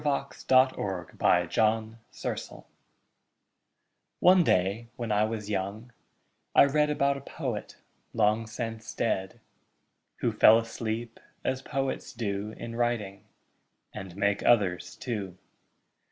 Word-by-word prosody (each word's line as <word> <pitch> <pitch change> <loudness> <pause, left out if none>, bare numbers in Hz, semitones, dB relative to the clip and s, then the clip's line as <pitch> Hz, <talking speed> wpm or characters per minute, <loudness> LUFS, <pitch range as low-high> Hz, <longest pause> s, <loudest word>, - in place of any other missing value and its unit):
XXIX 140 -2 -2 0.6
THE - - -20
POET 90 -1 +2
WHO 110 0 +2
SLEEPS - - -6 1.6
One 180 0 +6
day, 100 - +1
when 120 -3 -4
I 105 +1 +3
was 110 -2 -4
young, 105 +4 -3 0.6
I - - +8
read 150 +2 +2
About 140 -1 +1
a - - -8
poet, 130 -6 -5 0.4
long 110 0 +2
since 115 0 -6
dead, 95 -4 -1 0.8
Who - - +2
fell 110 - +7
asleep, 115 0 -4 0.2
as 130 0 -1
poets 135 0 -3
do 105 -3 -3
In 115 0 -7
writing 115 -5 -2 0.7
and 95 -2 -8
make 100 0 +1
others 100 -7 +2
too. 100 -7 -5
115 Hz, 115 wpm, -28 LUFS, 100-120 Hz, 1.6 s, I